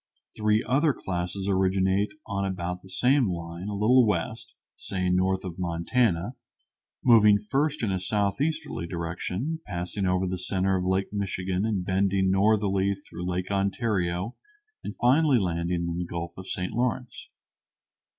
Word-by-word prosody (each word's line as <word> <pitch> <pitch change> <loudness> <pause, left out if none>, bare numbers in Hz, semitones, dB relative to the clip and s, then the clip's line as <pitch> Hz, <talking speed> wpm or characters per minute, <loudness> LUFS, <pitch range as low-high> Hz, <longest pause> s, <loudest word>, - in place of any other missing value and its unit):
Three 105 0 +2
other 145 +3 +2
classes 90 0 -3
originate 95 +1 +2
on 100 -2 -2
about 90 -2 -3
the 95 - -15
same 125 +4 +3
line, 85 +1 -5
a 105 - -3
little 120 +5 +5
west, 105 - -2 0.2
say, 90 -2 -2
north 95 +1 +1
of 90 -1 -6
Montana, 90 +4 0 0.7
moving 105 -4 +7
first 140 +7 -1
in 105 - +1
a 95 - 0
southeasterly 105 - -1
direction, 90 - -3
passing 90 +3 -3
over 90 +1 +1
the 90 0 -3
center 95 +1 0
of 90 -1 -1
Lake 95 +2 0
Michigan 95 -1 -1
and 100 -5 -1
bending 95 0 +2
northerly 100 -1 +2
through 90 -2 -7
Lake 90 +2 -2
Ontario 100 0 -1 0.5
and - - -6
finally 135 +2 +4
landing 85 -3 -1
in 85 0 -3
the 90 - -2
Gulf 85 0 -5
of 95 0 -9
St. 90 0 -3
Lawrence. 125 +1 -2
95 Hz, 145 wpm, -27 LUFS, 90-105 Hz, 0.7 s, moving